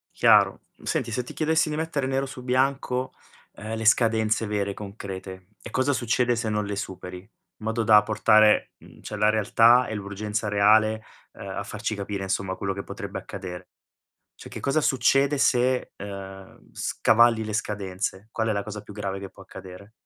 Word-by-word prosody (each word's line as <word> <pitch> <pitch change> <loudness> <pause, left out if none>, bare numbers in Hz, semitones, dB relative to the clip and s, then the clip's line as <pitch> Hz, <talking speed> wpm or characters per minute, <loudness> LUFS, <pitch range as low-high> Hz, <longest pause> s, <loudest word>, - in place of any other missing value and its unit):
Chiaro. - - +4 0.2
Senti, 115 - -2
se 125 +1 -2
ti - - -10
chiedessi 160 0 +1
di 150 - -3
mettere 155 -4 -2
nero 135 +1 0
su 130 -2 -9
bianco, 130 0 0 0.4
ehm, 110 +2 -6
le 110 - -4
scadenze 110 -1 +3
vere, 100 -1 -2
concrete, 95 -2 -8
e - - -9
cosa 130 +2 +1
succede 120 0 +1
se 115 -1 -2
non 105 -1 -1
le 100 0 -3
superi, 90 -2 -6
in 95 - -20 0.3
modo 110 +1 -2
da 105 -1 +7
portare, 110 0 +4
mhmm, - - -17
cioè, 105 - -7
la 105 +1 +3
realtà 115 +3 +4
e 110 - -4
l'urgenza 105 +2 -4
reale, 110 +2 +3 0.3
uhm, - - -10
a - - -4
farci 110 - -4
capire, 100 -1 -4
insomma, 95 0 -2
quello 95 -1 -3
che 100 - -6
potrebbe - - -6
accadere. 90 -2 -8 0.7
Cioè, - - -12
che - - -7
cosa 145 +3 +1
succede 135 +2 +2
se, 125 -1 +2
uhm, 95 -1 -10
scavalli 115 0 +3
le 105 - -5
scadenze? 100 0 -3
Qual 110 0 -1
è - - +2
la 100 -1 -1
cosa 105 0 -7
più 105 - -12
grave 100 -2 -4
che 100 - -7
può - - -15
accadere? 95 +3 -12
110 Hz, 180 wpm, -25 LUFS, 100-120 Hz, 0.7 s, da